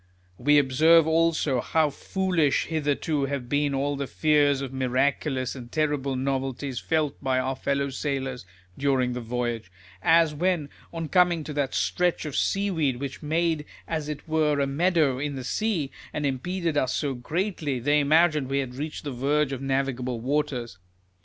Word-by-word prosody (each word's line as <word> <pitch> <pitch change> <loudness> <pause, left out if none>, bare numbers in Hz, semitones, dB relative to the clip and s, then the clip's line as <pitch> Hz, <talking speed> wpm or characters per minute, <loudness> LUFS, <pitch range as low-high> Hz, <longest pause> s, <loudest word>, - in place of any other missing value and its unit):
We 145 +4 +4
observe 150 +4 +5
also, 160 -5 +2
how 155 -2 +1
foolish 180 -2 0
hitherto 150 -2 0
have 135 -3 -4
been 145 +1 +1
all 140 +1 0
the 140 -1 -3
fears 145 -2 +3
of 135 -1 -5
miraculous 130 0 0
and 120 -3 -10
terrible 145 -3 0
novelties 135 0 -2
felt 155 -4 -1
by 130 -1 +1
our 130 +1 0
fellow 140 +1 -1
sailors 135 -2 -3 0.3
during 130 -3 +1
the 125 - -4
voyage; 120 -4 -3 0.3
as 165 - +4
when, 165 -2 0 0.2
on 165 -1 -4
coming 175 -2 +3
to 150 - -6
that 145 -2 -1
stretch 175 -2 0
of 150 - -5
seaweed, 165 -10 +1
which 135 -3 -5
made 160 0 0 0.2
as 155 -2 -3
it 150 +1 -6
were 155 -2 +2
a 140 - +2
meadow 150 -2 +2
in 145 0 -3
the 130 - -5
sea, 170 - -1 0.2
and 150 - -2
impeded 165 +4 -1
us 130 -3 +1
so 145 -3 -1
greatly, 155 +2 -2
they 145 +5 +3
imagined 155 -1 +3
we 135 - 0
had 130 -3 -2
reached 150 +4 -5
the 145 - -4
verge 140 +3 +1
of 135 -1 -4
navigable 135 -3 -1
waters. 125 -5 -2
145 Hz, 165 wpm, -26 LUFS, 130-155 Hz, 0.3 s, observe